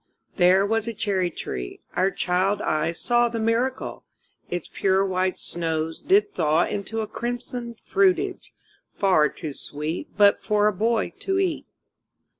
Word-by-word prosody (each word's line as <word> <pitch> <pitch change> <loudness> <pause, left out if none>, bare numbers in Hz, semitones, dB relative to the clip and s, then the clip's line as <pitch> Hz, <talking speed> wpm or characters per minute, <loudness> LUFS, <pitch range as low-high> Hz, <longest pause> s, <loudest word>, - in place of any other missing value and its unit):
There 185 +1 +5
was 225 +1 0
a 230 - -3
cherry 195 -4 0
tree 60 - -6
our 185 +2 +2
child 190 +2 0
eyes 165 0 -1
saw 240 0 +2
The 230 -1 -3
miracle: 230 +4 -1 0.5
Its 175 -2 -3
pure 195 0 +1
white 185 -1 0
snows 160 -1 -3
did 410 +2 +3
thaw 155 +1 +2
Into 220 +2 -3
a 215 - -3
crimson 240 0 -5
fruitage, 385 -1 +1 0.4
far 180 -7 +3
too 155 -1 -7
sweet 150 +4 -5
But 205 -1 +5
for 210 -1 +2
a 210 - +3
boy 225 +4 0
to 385 -1 -1
eat. 375 -4 -1
200 Hz, 145 wpm, -24 LUFS, 175-235 Hz, 0.5 s, There